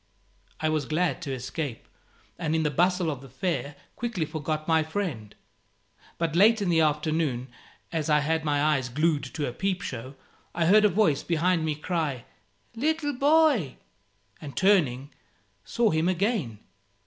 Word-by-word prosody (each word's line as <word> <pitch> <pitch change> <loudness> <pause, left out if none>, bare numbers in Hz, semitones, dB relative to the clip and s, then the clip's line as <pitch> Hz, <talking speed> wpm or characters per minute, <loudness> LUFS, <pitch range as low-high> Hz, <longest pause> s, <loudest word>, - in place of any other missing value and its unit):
I 155 - 0
was 155 -2 0
glad 175 +5 0
to 145 -5 -4
escape, 130 0 -5 0.5
and 160 -2 -1
in 160 - +1
the 150 - 0
bustle 175 +2 +2
of 135 -3 -6
the 135 - -12
fair 145 +1 -3 0.2
quickly 230 -9 -2
forgot 155 0 -4
my 160 -1 +4
friend. 155 - -4 0.8
But 165 -1 -1
late 220 +5 +5
in 200 -3 -1
the 165 -1 +3
afternoon, 150 -4 0 0.4
as 160 -1 -2
I 150 -1 +4
had 160 +1 0
my 145 -2 +1
eyes 145 -4 +1
glued 155 +3 +1
to 145 +2 -4
a 125 - -4
peep 190 +4 -2
show, 130 +2 -6 0.4
I 170 -1 +1
heard 210 +5 +6
a - - +6
voice 170 -8 +2
behind 170 0 +1
me 155 -1 -1
cry 150 -6 -3 0.5
"Little 290 +3 0
boy!" 280 - +3 0.7
and 145 -3 -9
turning, 150 -9 +2 0.5
saw 235 - +1
him 160 +2 +1
again. 185 - -1
160 Hz, 160 wpm, -26 LUFS, 145-185 Hz, 0.8 s, heard